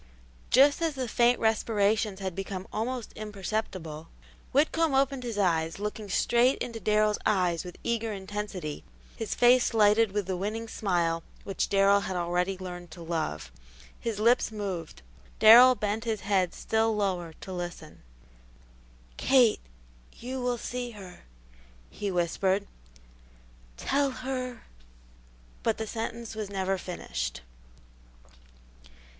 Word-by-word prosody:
Just 280 +5 +5
as 325 -3 0
the 260 -2 -3
faint 240 +2 +3
respirations 215 -2 +1
had 190 -2 -3
become 195 0 -5
almost 240 +2 -3
imperceptible, 195 -6 -5 0.4
Whitcomb 310 +1 +2
opened 270 -1 +2
his 235 -4 -5
eyes, 165 -4 +1
looking 210 0 -5
straight 240 +6 +3
into 230 -2 -5
Darrell's 210 +1 +2
eyes 180 -4 +1
with 180 -1 -9
eager 230 -1 -1
intensity, 195 -5 -5 0.3
his 225 - -3
face 245 -1 +4
lighted 215 0 +4
with 205 -1 -1
the 185 0 -2
winning 215 +5 -3
smile 175 -6 0 0.2
which 195 -2 -2
Darrell 200 0 +4
had 190 -2 -4
already 180 +2 0
learned 175 -2 -8
to 170 +1 -10
love. 160 - -3 0.5
His 230 -3 -3
lips 235 +2 +3
moved; 185 - -5 0.3
Darrell 240 +4 +9
bent 215 +1 -2
his 220 -3 -2
head 190 -3 +1
still 220 0 +1
lower 180 -5 -1
to 190 - -9
listen. 175 -3 -7 1.2
"Kate, 250 -5 +4 0.5
you 255 +2 -6
will 245 -1 0
see 245 +1 -4
her," 180 - -12 0.7
he 205 - -4
whispered. 190 +3 0 1.1
"Tell 280 - +1
her 255 -2 -5 0.5
" - - -28
but 225 - 0
the 220 - -3
sentence 230 +1 -5
was 215 -2 -5
never 195 -1 -1
finished. 60 - -4
205 Hz, 125 wpm, -28 LUFS, 180-230 Hz, 1.2 s, Darrell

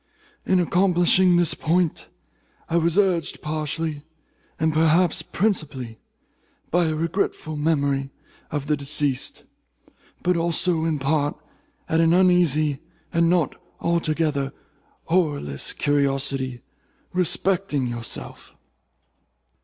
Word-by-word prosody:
In 185 - +3
accomplishing 180 0 +4
this 175 -3 +3
point, 170 0 0 0.6
I - - +1
was 170 +1 +2
urged 185 -6 +1
partly, 155 0 -3 0.6
and 160 0 +1
perhaps 160 +2 +3
principally, 145 - -2 0.7
by 175 +1 +3
a 160 -1 0
regretful 165 -1 -2
memory 140 -3 0 0.4
of 145 -2 -3
the 150 +1 +1
deceased, 140 -2 -1 0.8
but 180 0 +2
also, 170 0 +1
in 160 -2 0
part, 145 +1 0 0.5
by 160 - +1
an 165 0 +4
uneasy, 170 -6 +3 0.3
and 170 -1 +3
not 175 -5 +2 0.3
altogether 155 -5 0 0.6
horrorless 145 - 0
curiosity 135 -3 0 0.5
respecting 180 -4 0
yourself. 120 -2 -5
160 Hz, 100 wpm, -23 LUFS, 145-175 Hz, 0.8 s, accomplishing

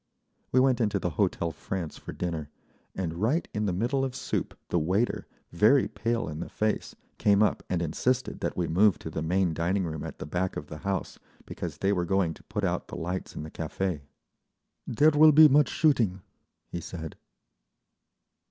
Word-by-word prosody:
We 130 - +4
went 130 -2 +3
into 105 -3 +1
the 90 -2 -2
Hotel 80 +2 0
France 85 +1 -5
for - - -8
dinner, 80 -4 -4 0.5
and 85 -2 -3
right 145 +11 +1
in 105 0 -1
the - - +1
middle 120 +9 0
of 130 -1 -3
soup 135 - -3
the 85 - +2
waiter, 95 +9 0 0.2
very 110 +11 +4
pale 115 0 -2
in 75 0 -5
the - - -5
face, 110 0 -1 0.2
came 100 0 +4
up 105 - +1
and 85 -2 0
insisted 125 +11 -1
that - - -3
we 90 - +1
move 95 +4 +4
to 80 - -7
the 80 - -3
main 90 +1 +1
dining 90 +4 0
room 80 -2 -4
at - - -7
the - - -6
back 90 +5 -2
of - - -7
the 75 - -7
house, 100 -1 -3 0.3
because 80 -4 -6
they 100 +4 +1
were 90 -3 0
going 90 -2 +1
to - - -17
put - - -4
out - - -1
the - - -7
lights 90 +3 -4
in - - -5
the 80 - -8
café. 80 0 -3 0.9
"There 150 +7 +4
will 155 +1 +7
be 155 +1 +9
much 145 -1 +4
shooting," 115 - +2 0.5
he 85 - -4
said. 80 -2 -7
95 Hz, 190 wpm, -28 LUFS, 85-115 Hz, 0.9 s, be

